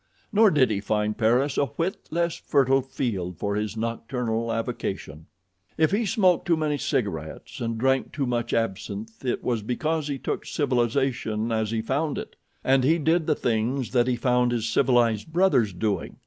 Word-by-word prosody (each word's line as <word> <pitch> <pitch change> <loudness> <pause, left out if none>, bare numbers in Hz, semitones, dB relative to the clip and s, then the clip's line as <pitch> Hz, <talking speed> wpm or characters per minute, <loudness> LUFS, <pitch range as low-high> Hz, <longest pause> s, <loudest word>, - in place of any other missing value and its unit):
Nor 215 +1 +6
did 135 - +3
he 100 - 0
find 105 0 0
Paris 125 +5 +2
a 140 - +2
whit 180 +5 -2
less 170 +1 0
fertile 135 -2 +2
field 100 -10 -3
for 100 0 -2
his 105 +1 -3
nocturnal 115 0 -2
avocation. 100 - -4 0.5
If 155 0 +3
he 210 +2 +1
smoked 185 -3 +2
too 170 -2 +3
many 150 -2 -1
cigarettes 80 - -3
and 115 -1 -2
drank 135 +2 +1
too 140 -2 -2
much 120 -1 -1
absinth 110 +1 -3
it 125 - -1
was 120 -3 0
because 150 +7 -1
he 140 -2 -2
took - - -3
civilization 120 -4 0
as 110 -1 0
he 110 0 -1
found 140 +5 -1
it, - - -7 0.3
and 135 0 +4
did 160 +3 +2
the 155 - +3
things 120 +1 -1
that 125 -1 +3
he 125 - +2
found 125 0 +2
his 115 -2 -1
civilized 115 +1 +2
brothers 165 - +3
doing. 95 0 -2
120 Hz, 170 wpm, -25 LUFS, 110-145 Hz, 0.5 s, Nor